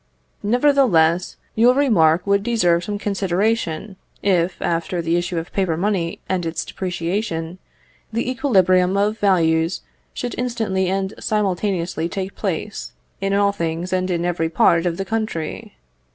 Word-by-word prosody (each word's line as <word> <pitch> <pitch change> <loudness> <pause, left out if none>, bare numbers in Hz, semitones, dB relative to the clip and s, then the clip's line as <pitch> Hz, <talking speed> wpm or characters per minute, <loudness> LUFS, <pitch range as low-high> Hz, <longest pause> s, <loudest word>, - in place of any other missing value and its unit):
Nevertheless, 210 - +3 0.2
your 240 +3 +4
remark 180 - +3
would 200 0 +2
deserve 180 -7 +2
some 205 +1 -3
consideration, 200 -1 -1 0.3
if, 180 -2 +1
after 170 +2 -1
the 165 0 0
issue 175 0 -1
of 165 +1 -5
paper 185 -5 0
money 180 -3 -1
and 185 -2 -1
its 165 -1 -3
depreciation, 180 -1 -3 0.5
the 230 +2 -1
equilibrium 190 -8 +3
of 210 +2 +1
values 165 -3 +2 0.3
should 245 - -3
instantly 220 -7 -1
and 190 0 -1
simultaneously 185 -5 -1
take 195 0 -4
place, 205 +2 -4 0.3
in 195 0 0
all 200 0 +3
things 170 -1 -3
and 185 0 0
in 175 -1 -1
every 170 -2 0
part 170 +1 +3
of 170 -1 -2
the 195 - -3
country. 215 -7 -4
190 Hz, 140 wpm, -21 LUFS, 170-210 Hz, 0.5 s, your